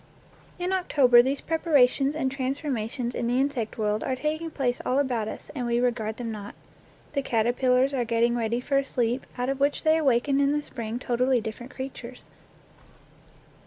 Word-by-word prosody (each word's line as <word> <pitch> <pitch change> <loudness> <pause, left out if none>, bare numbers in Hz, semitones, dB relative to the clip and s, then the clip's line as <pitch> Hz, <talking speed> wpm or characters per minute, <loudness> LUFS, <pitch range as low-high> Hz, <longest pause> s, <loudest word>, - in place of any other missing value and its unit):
In 360 +1 -2
October 275 -10 +5
these 270 +3 -1
preparations 290 -4 +2
and 265 -4 -1
transforma 265 -4 -2
tions 245 -1 -3
in 240 - -2
the 245 +2 +1
insect 265 -5 -1
world 210 -1 0
are 260 - -1
taking 310 +4 -2
place 255 -5 -1
all 255 - 0
about 250 -6 0
us, - - -7
and 250 -4 -3
we 235 0 +1
regard 230 -3 -1
them 235 -2 -4
not. 205 -2 -8 0.6
The 280 - 0
caterpillars 250 +3 +2
are 255 -3 +1
getting 235 +1 +1
ready 235 +1 -1
for 275 +2 0
a - - -1
sleep 245 -1 -1
out 250 0 -1
of 270 0 -2
which 285 +1 +1
they 315 0 +4
awaken 275 -1 +2
in 280 +1 +3
the 295 0 -1
spring 230 -4 -5
totally 250 +1 +1
different 230 +3 -7
creatures. 255 -2 -8
250 Hz, 180 wpm, -26 LUFS, 235-275 Hz, 0.6 s, October